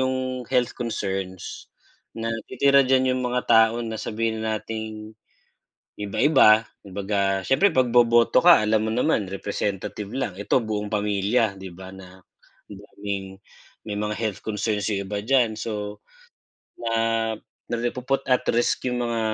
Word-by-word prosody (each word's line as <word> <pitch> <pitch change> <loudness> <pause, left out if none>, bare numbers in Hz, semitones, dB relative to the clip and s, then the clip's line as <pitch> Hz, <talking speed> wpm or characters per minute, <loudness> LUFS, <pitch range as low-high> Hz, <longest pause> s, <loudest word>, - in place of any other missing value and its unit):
yung 130 0 +1 0.3
health 125 -2 +1
concerns, 95 -6 -5 0.5
na 115 0 -2 0.2
titira 140 +2 +4
diyan 130 0 +2
yung 130 - -2
mga 125 0 -1
tao 110 0 +5
na 110 -1 -4
sabihin 110 0 -2
nating, 110 0 -4 0.9
iba-iba, 110 +1 +4 0.2
kumbaga 100 0 -1
siyempre 190 +9 +4
pagboboto 120 -2 +4
ka 175 -8 +8
alam 110 0 +2
mo 110 - -1
naman 125 -3 +1
representative 100 +1 -4
lang, 130 -8 -3
ito 105 - +2
buong 105 -3 -4
pamilya 105 +1 +1
'di 95 -1 -9
ba 95 +2 -10
na 95 0 -14 0.5
daming 100 -1 -7 0.5
may 105 - -3
mga 105 0 -2
health 110 -3 -3
concerns 105 -1 -1
yung 100 -1 -2
iba 105 -1 -2
diyan 120 -2 +2
so, 105 -2 -5 0.8
na 115 -1 0 0.4
ri 120 +1 0
napuput 130 +2 -2
at 125 0 +2
risk 120 +1 +1
yung 125 0 -1
mga 115 -1 -1
110 Hz, 135 wpm, -24 LUFS, 105-120 Hz, 0.9 s, ka